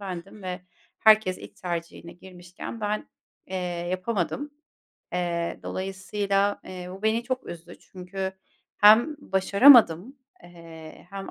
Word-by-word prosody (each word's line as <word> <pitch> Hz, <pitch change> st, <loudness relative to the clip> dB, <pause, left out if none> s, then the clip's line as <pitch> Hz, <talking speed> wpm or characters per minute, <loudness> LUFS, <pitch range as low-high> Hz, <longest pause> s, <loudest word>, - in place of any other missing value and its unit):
bendim 195 Hz, +1 st, -8 dB
ve 185 Hz, 0 st, -5 dB, 0.4 s
herkes 215 Hz, -4 st, +4 dB
ilk -, -, -13 dB
tercihine 170 Hz, -1 st, -6 dB
girmişken 180 Hz, +4 st, -10 dB
ben, 210 Hz, 0 st, -3 dB, 0.4 s
eee, 190 Hz, -, -5 dB, 0.3 s
yapamadım. 205 Hz, -, -2 dB, 0.6 s
Eee, 170 Hz, -1 st, -2 dB
dolayısıyla, 195 Hz, +1 st, -2 dB
eee, 180 Hz, -1 st, -8 dB
bu 190 Hz, +2 st, -10 dB
beni 220 Hz, +2 st, +1 dB
çok 255 Hz, +1 st, -4 dB
üzdü. 175 Hz, 0 st, -10 dB
Çünkü 190 Hz, +1 st, -6 dB, 0.5 s
hem 230 Hz, +9 st, +6 dB
başaramadım, 205 Hz, -, +5 dB, 0.3 s
eee, 165 Hz, -2 st, -13 dB
hem 195 Hz, -1 st, -7 dB
190 Hz, 110 wpm, -25 LUFS, 175-210 Hz, 0.6 s, hem